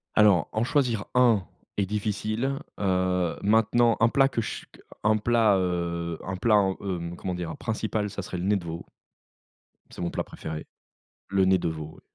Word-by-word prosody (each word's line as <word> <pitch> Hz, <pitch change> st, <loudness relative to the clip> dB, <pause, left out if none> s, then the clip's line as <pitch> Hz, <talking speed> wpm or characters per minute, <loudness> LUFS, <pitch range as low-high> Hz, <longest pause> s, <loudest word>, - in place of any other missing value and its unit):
Alors, 105 Hz, -7 st, +5 dB
en 110 Hz, -, 0 dB
choisir 125 Hz, -7 st, +1 dB
un 115 Hz, -7 st, +4 dB, 0.3 s
est 100 Hz, -, +2 dB
difficile, 110 Hz, +6 st, -2 dB, 0.2 s
heu, 90 Hz, -3 st, +1 dB
maintenant 115 Hz, +2 st, +4 dB
un 115 Hz, -, +6 dB
plat 135 Hz, +3 st, +4 dB
que 125 Hz, -3 st, -1 dB
ch 110 Hz, -, -5 dB
q -, -, -18 dB, 0.2 s
un 110 Hz, +1 st, +4 dB
plat, 110 Hz, -1 st, +3 dB
heu, 85 Hz, -2 st, -2 dB
un 95 Hz, -, -3 dB
plat 105 Hz, +3 st, +3 dB
en, 95 Hz, -2 st, +2 dB
hem, 85 Hz, -3 st, -4 dB
comment 90 Hz, +1 st, -4 dB
dire? 85 Hz, -2 st, -4 dB
Principal, 110 Hz, -2 st, -2 dB
ça -, -, -5 dB
serait 90 Hz, -, -6 dB
le 90 Hz, -, -3 dB
nez 100 Hz, +2 st, +2 dB
de 90 Hz, -, -7 dB
veau 85 Hz, 0 st, -6 dB, 1.0 s
c'est -, -, -13 dB
mon 85 Hz, -, -2 dB
plat -, -, -2 dB
préféré. 80 Hz, -1 st, -7 dB, 0.6 s
Le 95 Hz, -1 st, +3 dB
nez 95 Hz, 0 st, +5 dB
de 85 Hz, -, -2 dB
veau, 80 Hz, -1 st, -5 dB
ouais. -, -, -17 dB
100 Hz, 190 wpm, -26 LUFS, 90-110 Hz, 1.0 s, un